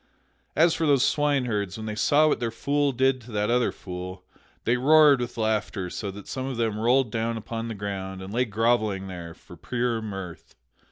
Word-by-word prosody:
As 165 +3 +5
for 160 - 0
those 140 -2 +4
swineherds, 125 - 0
when 110 - -6
they 110 - -3
saw 145 +8 +4
what - - +1
their 120 -1 -1
fool 140 +5 0
did 130 0 +1
to 120 +1 -13
that 105 +2 0
other 125 0 +2
fool, 90 0 -8 0.4
they 120 - +2
roared 145 +1 +6
with 120 -1 -5
laughter 105 -4 -1
so 100 - -4
that 100 +1 -9
some 130 0 -4
of 130 -3 -4
them 110 -2 -1
rolled 120 +1 +3
down 115 +1 -1
upon 115 +1 -5
the 115 - -5
ground 95 -2 -5
and 95 +2 -8
lay 125 +2 +2
grovelling 110 -3 +1
there 85 -3 -8
for - - -14
pure 120 -2 -2
mirth. 95 -5 -8
115 Hz, 200 wpm, -26 LUFS, 100-130 Hz, 0.4 s, roared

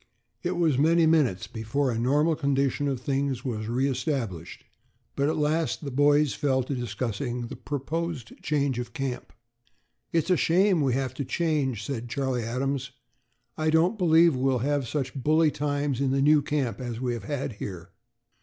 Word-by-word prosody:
It 175 0 -2
was 160 -6 +2
many 165 +3 +4
minutes 145 - +2
before 120 +4 -1
a 115 - -2
normal 150 +7 +2
condition 140 -1 0
of 135 -3 -1
things 135 -2 -2
was 110 -4 -3
re 125 +4 +1
established, 125 - -3 0.5
but 140 +1 +1
at - - -1
last 155 0 0
the 140 - -4
boys 145 +1 +3
fell 130 -2 +1
to 135 - -4
discussing 120 +1 -3
the - - -6
proposed 150 -2 -4
change 140 -4 0
of 120 -1 -6
camp. 135 -2 -4 0.8
"It's 165 +3 +1
a 180 - +4
shame 185 +2 +3
that 145 - +2
we 130 - +1
have 130 -2 -2
to 140 - -4
change," 140 -8 -1
said 120 -3 -4
Charlie 130 -1 -1
Adams; 130 +3 -2 0.7
"I 155 0 +1
don't 170 +7 +2
believe 165 -3 +5
we'll 130 0 +1
have 145 -3 0
such 135 -1 -2
bully 155 +3 +2
times 145 -2 -1
in 135 - +2
the 135 +1 +1
new 150 0 +5
camp 140 -4 -2
as 120 -2 -4
we 125 -1 -1
have 115 -4 -6
had 135 -2 -3
here." 90 -3 -6
140 Hz, 175 wpm, -27 LUFS, 125-150 Hz, 0.8 s, believe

